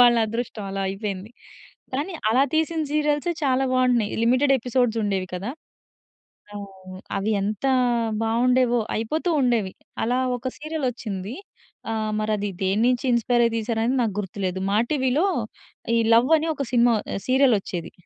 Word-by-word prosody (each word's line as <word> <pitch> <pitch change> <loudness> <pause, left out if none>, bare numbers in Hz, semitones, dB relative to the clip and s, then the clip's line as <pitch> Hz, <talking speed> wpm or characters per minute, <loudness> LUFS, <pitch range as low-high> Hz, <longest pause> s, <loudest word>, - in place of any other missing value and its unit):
వాళ్ళ 240 -1 +7
అదృష్టం 220 -1 -4
అలా 195 0 -3
అయిపోయింది. 195 +1 -5 0.6
కానీ 310 +7 -2 0.2
అలా 250 +4 +4
తీసిన 320 +1 +1
సీరియల్సే 300 +2 +1
చాలా 265 0 +2
బావుంటున్నాయి. 250 -4 +2
లిమిటెడ్ 255 +4 +3
ఎపిసోడ్స్ 245 -1 0
ఉండేవి 195 -3 -1
కదా! 195 +6 -4 1.0
ఆ! - - -5 0.6
అవి 195 +2 -1
ఎంత 210 +5 -2 0.6
బావుండేవో. 245 +2 +2
అయిపోతూ 310 +11 -1
ఉండేవి. 230 -7 +1 0.3
అలా 245 +3 +1 0.2
ఒక 250 +1 -4
సీరియల్ 310 -1 -4
వచ్చింది. 210 -3 -6 0.6
ఆహ్, 215 -1 -2
మరి 215 0 -1
అది 205 0 -2
దేన్నించి 230 +7 +2
ఇన్‌స్పైర్ 240 +1 +2
అయి 230 - -1
తీశారు 225 0 -1
అని 250 +3 +1
నాకు 220 -4 -1
గుర్తులేదు. 190 -2 -3
మా 205 - +3
టీవీ‌లో 275 +2 +1 0.7
ఈ - - +4 0.2
లవ్ 240 +5 +4
అని 310 - -2
ఒక 280 - -3
సినిమా 240 -1 +4 0.2
ఆహ్, - - -3
సీరియల్ 260 -1 +4
వచ్చేది. 170 -3 -6
235 Hz, 145 wpm, -24 LUFS, 210-260 Hz, 1.0 s, వాళ్ళ